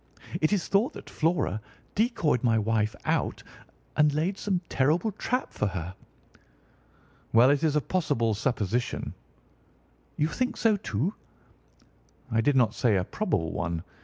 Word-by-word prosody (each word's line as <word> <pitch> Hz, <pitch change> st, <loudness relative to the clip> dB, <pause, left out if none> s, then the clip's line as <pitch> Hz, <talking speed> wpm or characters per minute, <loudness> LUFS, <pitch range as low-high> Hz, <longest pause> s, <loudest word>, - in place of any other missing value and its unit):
It 155 Hz, -, +3 dB
is 205 Hz, -4 st, +1 dB
thought 205 Hz, +6 st, +2 dB
that -, -, -10 dB
Flora 160 Hz, -, 0 dB, 0.3 s
decoyed 210 Hz, -, +1 dB
my 115 Hz, -2 st, +3 dB
wife 110 Hz, 0 st, +1 dB
out -, -, 0 dB, 0.5 s
and 150 Hz, 0 st, +4 dB
laid 160 Hz, +7 st, 0 dB
some 190 Hz, -3 st, -1 dB
terrible 160 Hz, +10 st, +2 dB
trap 250 Hz, +5 st, -2 dB
for 105 Hz, -, 0 dB
her." 90 Hz, -2 st, -4 dB, 1.4 s
"Well, 120 Hz, +4 st, +7 dB
it 145 Hz, +2 st, +1 dB
is 155 Hz, -2 st, +2 dB
a 150 Hz, -, +3 dB
possible 140 Hz, -11 st, 0 dB
supposition." 115 Hz, 0 st, -1 dB, 1.0 s
"You 150 Hz, -, +2 dB
think 255 Hz, +9 st, -2 dB
so, 225 Hz, -2 st, +3 dB
too?" 165 Hz, -, -2 dB, 1.2 s
"I 115 Hz, 0 st, +3 dB
did 145 Hz, +4 st, +2 dB
not 120 Hz, -4 st, +4 dB
say 115 Hz, -3 st, +2 dB
a 95 Hz, -, +2 dB
probable 110 Hz, -, -1 dB
one. 85 Hz, -1 st, -2 dB
140 Hz, 140 wpm, -27 LUFS, 110-180 Hz, 1.4 s, Well